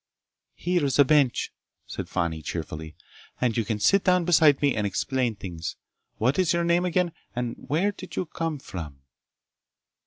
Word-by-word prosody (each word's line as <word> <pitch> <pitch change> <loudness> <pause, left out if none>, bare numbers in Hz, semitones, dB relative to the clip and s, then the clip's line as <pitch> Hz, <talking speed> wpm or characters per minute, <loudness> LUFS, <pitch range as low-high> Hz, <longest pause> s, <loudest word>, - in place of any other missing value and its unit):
"Here's 170 -7 0
a 145 - +7
bench," 140 -3 +2 0.3
said - - -6
Fani 85 -3 -1
cheerfully, 80 -1 -5 0.4
"and 120 -3 +1
you 115 - +1
can 105 0 -2
sit 195 - +4
down 180 -2 +3
beside 155 -5 +5
me 145 -2 +3
and 105 -2 0
explain 125 +3 -1
things. 85 -5 -6 0.4
What's 150 +10 +2
your 170 0 +1
name, 170 +1 +2
again, 180 0 +1 0.2
and 120 -1 -2
where 165 +9 +2
did 185 -2 -10
you - - -1
come 165 -1 -3
from?" 75 - -8
135 Hz, 155 wpm, -26 LUFS, 100-170 Hz, 0.4 s, a